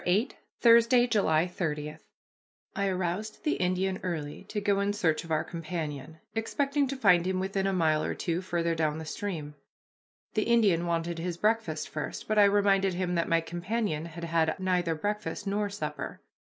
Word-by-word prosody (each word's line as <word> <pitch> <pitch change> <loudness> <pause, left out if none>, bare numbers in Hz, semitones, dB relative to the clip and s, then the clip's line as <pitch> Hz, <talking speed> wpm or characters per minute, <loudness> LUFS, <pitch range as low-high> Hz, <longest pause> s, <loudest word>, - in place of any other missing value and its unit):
VIII 205 +9 +2 0.3
THURSDAY, 235 +1 +6
JULY 180 -9 +2
30 150 -4 -3 0.8
I 200 0 0
aroused 190 +3 -2
the 305 - +1
Indian 185 +1 0
early 155 -5 -4
to 210 - -3
go 200 -1 +1
in 200 +1 +1
search 165 -6 +1
of 165 - -12
our 155 -1 +1
companion, 160 -3 -5 0.2
expecting 275 +5 0
to 275 - -3
find 180 -7 +4
him 185 0 0
within 195 +1 -1
a - - +1
mile 160 -4 +2
or - - -2
two, 170 0 -2
farther 170 -2 -1
down 155 -2 0
the 160 - -6
stream. 160 -5 -4 0.8
The 215 - +1
Indian 205 -8 +3
wanted 170 0 -1
his 170 0 -3
breakfast 210 -7 0
first, 150 - -5
but 215 -1 +2
I 205 - +8
reminded 200 -2 +3
him 180 0 -1
that 170 -1 0
my 165 0 +3
companion 175 0 -2
had 170 0 -8
had 165 0 +1
neither 180 -3 +1
breakfast 205 +4 -3
nor 205 +1 0
supper. 200 +1 -5
180 Hz, 175 wpm, -29 LUFS, 165-205 Hz, 0.8 s, I